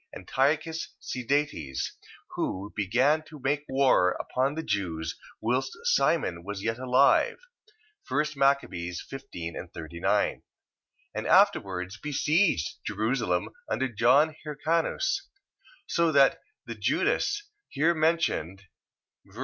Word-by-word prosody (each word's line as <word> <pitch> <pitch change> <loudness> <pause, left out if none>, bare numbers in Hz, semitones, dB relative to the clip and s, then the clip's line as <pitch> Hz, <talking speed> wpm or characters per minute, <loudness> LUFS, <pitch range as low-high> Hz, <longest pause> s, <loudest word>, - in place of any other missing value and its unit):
Antiochus 150 - -1
Sidetes, 125 - -2 0.4
who 100 +2 -3
began 125 +10 +2
to 155 -1 -12
make 145 +2 -1
war 130 -9 +4
upon 135 +3 -1
the 160 - -3
Jews, 80 - -2 0.2
whilst 125 +4 -1
Simon 165 - +1
was 100 +1 -6
yet 115 +2 -1
alive. 130 +2 +4 0.7
1 150 - +2
Mac. 140 0 +4
15.39. 85 - -3 0.7
And - - -3
afterwards 95 +2 +3
besieged 150 - +1
Jerusalem 110 -5 -1 0.2
under 130 - 0
John 130 +7 +3
Hircanus. 165 - 0 0.6
So 170 -1 +2
that 140 -2 +5 0.3
the - - -5
Judas 415 0 0 0.3
here 160 +5 +2
mentioned, 155 - 0 0.6
ver. - - -15
130 Hz, 100 wpm, -28 LUFS, 95-150 Hz, 0.7 s, that